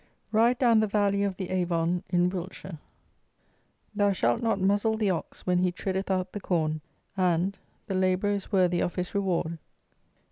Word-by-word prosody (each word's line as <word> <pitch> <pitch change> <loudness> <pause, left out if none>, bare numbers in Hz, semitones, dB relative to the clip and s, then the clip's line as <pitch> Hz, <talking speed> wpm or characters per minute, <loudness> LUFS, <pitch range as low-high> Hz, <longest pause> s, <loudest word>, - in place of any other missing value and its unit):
RIDE 230 +3 +4
DOWN 235 -3 +4
THE 215 - +2
VALLEY 200 -1 +1
OF 195 -2 -2
THE 185 -2 -5
AVON 175 -1 0
IN 175 0 +3
WILTSHIRE. 185 -2 -7 1.1
"Thou 205 -1 +2
shalt 120 -9 +1
not 225 -3 +1
muzzle 205 +3 +2
the 210 -3 +1
ox 170 - -5
when 180 -1 +2
he 180 0 +2
treadeth 190 +2 -3
out 185 -1 0
the 205 - -6
corn; 155 -4 0 0.3
and, 185 +1 +1 0.3
The 200 - -4
labourer 185 +2 +1
is 200 0 -3
worthy 180 -3 +3
of 175 - -1
his 180 -1 -3
reward." 175 -4 -1
185 Hz, 170 wpm, -27 LUFS, 180-200 Hz, 1.1 s, RIDE